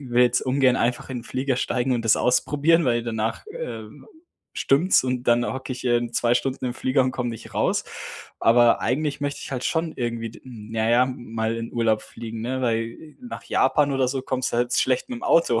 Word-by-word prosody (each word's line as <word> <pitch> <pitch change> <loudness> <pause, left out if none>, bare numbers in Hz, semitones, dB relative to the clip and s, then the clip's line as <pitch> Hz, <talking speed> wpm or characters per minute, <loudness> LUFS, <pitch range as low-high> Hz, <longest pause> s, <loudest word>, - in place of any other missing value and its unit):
will 125 -3 +2
jetzt 125 0 +3
ungern 130 -1 +3
einfach 120 +2 -1
in 125 - -3
den 120 - -10
Flieger 130 0 -1
steigen 130 0 0
und 115 -2 -1
das 110 - +5
ausprobieren, 150 +6 +2
weil 120 -1 +2
danach, 110 - -3
äh, 485 +2 -6 0.7
stimmt's 145 +3 +3
und 125 -1 -1
dann 120 0 +4
hocke 130 0 -5
ich, 130 - -8
ähm, 120 -1 +1
2 120 +1 +2
Stunden 135 0 -1
im 120 - -3
Flieger 130 +1 +1
und 130 - -1
komme 120 -2 -2
nicht 115 - -10
raus. - - +1 0.6
Aber 120 0 +5
eigentlich 145 +4 -1
möchte 145 0 -2
ich - - -7
halt 130 -1 -3
schon 160 -1 0
irgendwie 115 -2 -3
d - - -15
na 110 -2 -3
ja 125 +2 +5
mal 115 -3 -3
in 115 0 -6
Urlaub 110 -2 +1
fliegen, 115 -1 -8
ne? 130 +3 -2
Weil 115 +6 -3
nach 245 -2 -8
Japan 140 +2 +2
oder 130 -1 +1
so 135 +1 -2
kommst 130 -1 -2
du - - 0
halt 120 0 0
s - - +3
schlecht 130 - 0
mit 250 - -3
dem - - -15
Auto, 120 -9 +3
125 Hz, 215 wpm, -24 LUFS, 115-135 Hz, 0.7 s, das